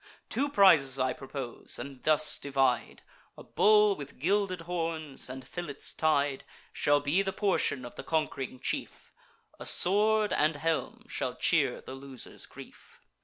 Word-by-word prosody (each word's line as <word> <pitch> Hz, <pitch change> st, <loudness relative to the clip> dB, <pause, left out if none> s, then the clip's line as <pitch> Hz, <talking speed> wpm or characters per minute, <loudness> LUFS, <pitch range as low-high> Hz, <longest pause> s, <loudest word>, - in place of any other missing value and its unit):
Two 280 Hz, +5 st, 0 dB
prizes 165 Hz, -, +5 dB
I 130 Hz, 0 st, +1 dB
propose, 135 Hz, -3 st, -5 dB
and 135 Hz, -2 st, -8 dB
thus 155 Hz, 0 st, +2 dB
divide: 135 Hz, -3 st, 0 dB, 0.3 s
A -, -, -10 dB
bull 210 Hz, -1 st, +4 dB
with 140 Hz, -3 st, -9 dB
gilded 185 Hz, +3 st, 0 dB
horns, 165 Hz, -5 st, -4 dB
and 130 Hz, 0 st, -8 dB
fillets 175 Hz, -6 st, -5 dB
tied, 145 Hz, -3 st, +1 dB, 0.3 s
Shall 145 Hz, 0 st, +3 dB
be 145 Hz, +6 st, +1 dB
the 195 Hz, -1 st, -1 dB
portion 185 Hz, -10 st, 0 dB
of 120 Hz, -, -9 dB
the -, -, -8 dB
conqu'ring 140 Hz, -5 st, -2 dB
chief; -, -, -4 dB, 0.5 s
A -, -, -7 dB
sword 210 Hz, +3 st, +3 dB
and 150 Hz, +1 st, +2 dB
helm 160 Hz, +2 st, -2 dB
shall -, -, -3 dB
cheer -, -, +2 dB
the -, -, -9 dB
loser's 135 Hz, -2 st, -9 dB
grief." -, -, -14 dB
150 Hz, 145 wpm, -30 LUFS, 135-185 Hz, 0.5 s, prizes